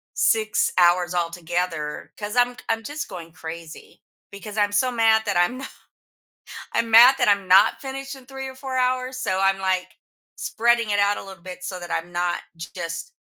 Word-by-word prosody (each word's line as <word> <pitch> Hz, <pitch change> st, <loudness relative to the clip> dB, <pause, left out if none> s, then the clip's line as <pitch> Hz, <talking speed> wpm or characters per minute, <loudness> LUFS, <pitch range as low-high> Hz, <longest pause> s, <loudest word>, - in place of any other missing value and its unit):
6 215 Hz, -1 st, +2 dB
hours 175 Hz, 0 st, +4 dB
altogether 170 Hz, -2 st, -3 dB
'cause 210 Hz, +2 st, -5 dB
I'm 245 Hz, 0 st, +3 dB
I'm 225 Hz, 0 st, 0 dB
just 290 Hz, +5 st, -5 dB
going 170 Hz, -4 st, -9 dB
crazy. 165 Hz, -1 st, -10 dB, 0.3 s
Because 205 Hz, +1 st, -9 dB
I'm 205 Hz, -1 st, +2 dB
so 255 Hz, +5 st, +2 dB
mad 225 Hz, -2 st, +3 dB
that 205 Hz, -, 0 dB
I'm 175 Hz, +9 st, +2 dB
no 270 Hz, -, -6 dB, 1.1 s
I'm 230 Hz, -, 0 dB
mad 245 Hz, +4 st, +9 dB
that -, -, +2 dB
I'm 200 Hz, -2 st, +2 dB
not 195 Hz, +4 st, +5 dB
finished 270 Hz, 0 st, -6 dB
in 265 Hz, -2 st, -15 dB
3 265 Hz, 0 st, -7 dB
or 260 Hz, -, -9 dB
4 260 Hz, -1 st, -5 dB
hours, 255 Hz, 0 st, 0 dB
so 190 Hz, -7 st, -1 dB
I'm, 195 Hz, 0 st, +2 dB
like, 185 Hz, -1 st, 0 dB, 0.5 s
spreading 235 Hz, -1 st, +1 dB
it 205 Hz, -, +1 dB
out 200 Hz, 0 st, +2 dB
a -, -, -7 dB
little 190 Hz, -3 st, -12 dB
bit 180 Hz, 0 st, -9 dB
so 185 Hz, -1 st, -5 dB
that 175 Hz, 0 st, -9 dB
I'm 175 Hz, +2 st, -3 dB
not, 175 Hz, 0 st, -1 dB, 0.2 s
just, 170 Hz, -, -6 dB
205 Hz, 185 wpm, -23 LUFS, 175-245 Hz, 1.1 s, mad